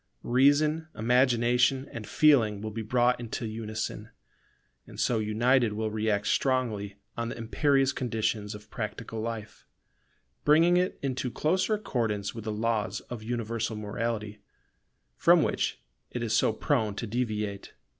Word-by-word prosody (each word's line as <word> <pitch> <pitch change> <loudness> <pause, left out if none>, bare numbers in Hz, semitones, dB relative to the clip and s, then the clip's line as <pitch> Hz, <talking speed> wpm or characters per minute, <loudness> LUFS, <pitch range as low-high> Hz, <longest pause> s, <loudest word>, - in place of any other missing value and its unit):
Reason, 145 +5 +3
Imagination, 125 +2 +3
and 110 -2 -7
Feeling 120 -10 +4
will 110 +1 -5
be 110 +2 -4
brought 125 +2 +2
into 120 0 -4
unison: 110 0 -4 0.8
and - - -11
so 120 -3 +2
united 115 +2 +2
will 110 0 -2
react 105 -1 0
strongly 110 -6 0 0.2
on 115 0 -3
the - - -6
imperious 135 +4 +2
conditions 110 -4 -2
of 105 - -13
practical 110 -1 -5
life; 110 -1 -6 0.8
bringing 165 +4 +5
it 180 +1 +1
into 130 -1 -1
closer 185 - +1
accordance 115 - -2
with 115 -1 -8
the 110 - -2
laws 110 0 -1
of 120 -3 -5
universal 115 -1 -2
morality, 105 0 -3 0.8
from - - +5
which - - -1 0.3
it 120 - -4
is 110 -2 -1
so 110 - +3
prone 110 -3 0
to 115 - -4
deviate. 105 -3 -3
115 Hz, 135 wpm, -28 LUFS, 110-130 Hz, 0.8 s, bringing